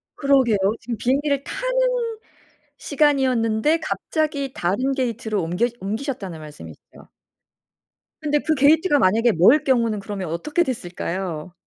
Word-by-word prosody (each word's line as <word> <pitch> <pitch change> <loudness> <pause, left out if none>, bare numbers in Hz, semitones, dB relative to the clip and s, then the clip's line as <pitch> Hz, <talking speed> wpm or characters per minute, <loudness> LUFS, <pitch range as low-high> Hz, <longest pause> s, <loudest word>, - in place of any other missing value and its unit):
그러게요. 270 -6 +3 0.2
지금 235 0 -5
비행기를 280 +2 0
타는 - - -1 0.6
시간이었는데 270 -2 +1
갑자기 300 -4 -2
다른 255 +10 -1
게이트로 230 -5 -2
옮겨 180 +8 0
옮기셨다는 200 - -4
말씀이시죠? 145 - -13 1.1
근데 295 -1 +1
그 315 +2 0
게이트가 295 +3 +4
만약에 225 +4 +3
멀 225 - +5
경우는 230 -5 +1
그러면 195 -3 -5
어떻게 295 - 0
됐을까요? 180 - -5
255 Hz, 325 characters per minute, -22 LUFS, 200-295 Hz, 1.1 s, 멀